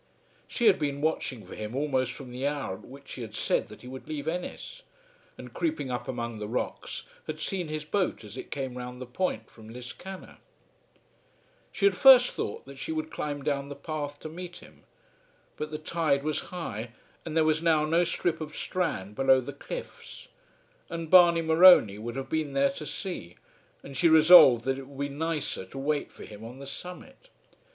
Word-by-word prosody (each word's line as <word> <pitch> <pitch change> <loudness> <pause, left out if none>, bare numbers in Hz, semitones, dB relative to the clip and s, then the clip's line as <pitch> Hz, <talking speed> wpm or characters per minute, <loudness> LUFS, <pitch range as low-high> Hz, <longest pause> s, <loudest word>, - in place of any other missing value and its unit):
She 240 - -2
had 205 -4 +6
been 145 -2 -1
watching 145 -6 -2
for - - -11
him 110 +2 -6
almost 130 -3 0
from 130 -1 -9
the 130 +3 -2
hour 145 -9 -2
at - - -10
which 140 +2 -11
he 125 - -7
had 110 -2 -7
said - - 0
that - - -13
he - - -10
would 130 +1 -9
leave 150 -1 -5
Ennis, 180 - -5 0.6
and, - - -10
creeping 310 - -2
up 120 -1 -4
among 120 -3 -4
the 105 - -4
rocks, 115 - -4 0.2
had - - -5
seen 185 -4 -3
his 155 0 -4
boat 185 - -1
as 105 0 -10
it - - -8
came 130 -3 -4
round 125 0 -7
the 130 - -6
point 180 +10 -2
from 110 -1 -14
Liscannor. 125 +11 -9 1.3
She 200 - 0
had 200 -2 +5
first 250 +4 +8
thought - - -4
that 135 0 -11
she - - -4
would 155 0 -3
climb 145 -1 -4
down 140 -1 -1
the 145 - -6
path 145 -2 -5
to - - -6
meet 175 +2 -8
him; - - -17 0.7
but 150 - -4
the 155 - -4
tide 155 -3 0
was 155 0 -1
high 120 - -5 0.3
and 160 -1 -3
there 160 - +4
was 155 0 +2
now 160 -2 +3
no 165 +3 +3
strip 165 -1 -1
of 155 -1 -6
strand 105 - -2
below 130 +2 +4
the 130 +3 -6
cliffs; - - -9 0.6
and 165 -1 -5
Barney 170 -2 +7
Morony 160 - +7
would 120 +2 -5
have 135 0 -4
been 155 -1 -2
there 140 0 +3
to 155 -5 -7
see; 145 - -6 0.5
and 140 - -10
she 170 +2 +4
resolved 155 -7 +8
that 135 0 0
it 135 - -9
would 140 0 -4
be - - -9
nicer 160 -7 -2
to 115 - -11
wait 145 +2 -1
for - - -11
him 105 0 -11
on 120 +3 -9
the 140 - -9
summit. 180 - -10
145 Hz, 200 wpm, -28 LUFS, 130-165 Hz, 1.3 s, first